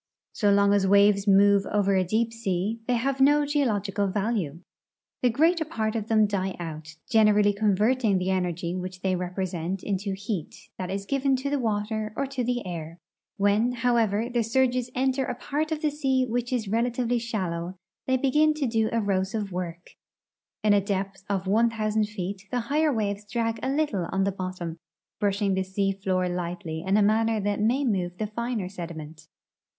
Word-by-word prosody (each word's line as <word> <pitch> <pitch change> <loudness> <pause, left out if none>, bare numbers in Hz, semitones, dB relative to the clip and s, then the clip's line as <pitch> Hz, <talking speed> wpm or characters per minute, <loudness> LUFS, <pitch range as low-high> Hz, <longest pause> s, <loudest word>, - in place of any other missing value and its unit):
So 205 -2 +2
long 200 0 +4
as 200 -1 +3
Avaves 200 +1 +4
move 200 0 +5
over 200 -1 +1
a 190 -1 +3
deep 225 +5 0
sea 210 0 -2
they 250 - +2
have 270 +3 -1
no 290 +2 +5
geological 210 -9 0
value. 195 -6 -2 0.6
The 250 - +4
greater 320 +7 +3
part 225 -8 -2
of 220 -2 -2
them 220 -1 +4
die 195 -2 -2
out, 160 -1 -7
generally 210 -3 +4
converting 210 +2 +2
the 185 +1 0
energy 175 -2 -1
Avhich 185 0 -5
they 190 -1 +1
represent 180 0 -3
into 200 0 -2
heat, 195 -4 -6
that 185 -1 -3
is 195 +1 -3
given 275 +2 +1
to 270 +2 -3
the 290 - +1
Avater 215 -1 -2
or 275 - -1
to 265 -2 -3
the 245 -1 -1
air. 165 -2 -6 0.4
AMien, 210 +5 +2
hoAvever, 230 -1 +1
the 240 - +2
surges 250 +1 +1
enter 265 +1 +1
a 250 - -3
part 300 +5 -2
of 310 -1 -2
the 305 - +2
sea 265 -3 +1
Avhich 245 +1 -2
is 240 -5 -1
relatively 240 +2 0
shallow, 185 -6 -3 0.3
they 260 0 +3
begin 300 +4 +3
to 300 -2 -1
do 225 -2 +1
erosive 205 -1 -1
AVork. 175 -1 -5 0.8
In 210 -1 +5
a 200 - +4
depth 195 0 -3
of 195 -2 -1
one 225 +5 +3
thousand 215 -1 0
feet 195 -1 -5
the 250 -1 -1
higher 305 +1 +3
Avaves 205 -3 -2
drag 230 -1 -1
a 260 - -1
little 270 - 0
on 195 0 +1
the 200 - +1
bottom, 185 -3 -5 0.4
brushing 200 -1 +1
the 190 - +1
sea 195 +1 0
floor 190 -2 -1
lightly 175 -2 -4
in 195 +2 +2
a 210 - +4
manner 220 +1 +2
that 205 0 -1
may 250 +6 +2
move 180 -6 -1
the 215 - -2
finer 225 -2 -3
sediment. 160 -4 -8
205 Hz, 180 wpm, -26 LUFS, 190-240 Hz, 0.8 s, move